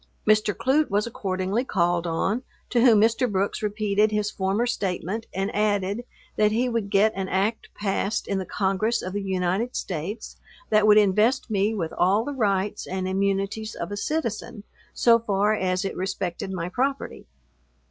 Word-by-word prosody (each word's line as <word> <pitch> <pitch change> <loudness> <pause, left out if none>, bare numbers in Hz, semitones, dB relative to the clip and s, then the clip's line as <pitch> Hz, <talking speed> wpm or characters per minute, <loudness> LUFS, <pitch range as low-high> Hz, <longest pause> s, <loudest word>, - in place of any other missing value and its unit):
Mr. 215 0 +4
Clute 280 +8 +1
was 205 +1 +1
accordingly 195 0 -2
called 175 -6 0
on, 195 +8 0 0.3
to 240 - +3
whom 230 -4 +6
Mr. 230 +2 +2
Brooks 195 +1 -1
repeated 210 0 +1
his 210 0 -1
former 195 +4 0
statement, 200 -1 -2
and 195 +1 -3
added, 205 +2 0 0.3
that 210 0 +4
he 240 +4 +1
would 230 -4 -2
get 210 +2 +3
an 190 -1 -3
act 200 +4 -1
passed 205 +1 -1
in 195 -1 -1
the 190 - -4
Congress 200 +4 0
of 185 - -5
the 205 - -2
United 190 +5 -1
States, 185 +6 -5 0.3
that 215 0 +4
would 210 0 +7
invest 215 +5 +3
me 205 +2 +1
with 165 -6 -3
all 195 +5 +2
the 290 - -3
rights 205 -4 -1
and 185 0 -3
immunities 195 +3 -1
of 170 - -5
a - - -2
citizen, 230 -3 -3 0.3
so 235 -1 +4
far 210 -1 +1
as 185 -2 0
it 195 - -3
respected 185 -1 -3
my 180 -2 -3
property. 270 +8 -2
205 Hz, 170 wpm, -25 LUFS, 190-220 Hz, 0.3 s, would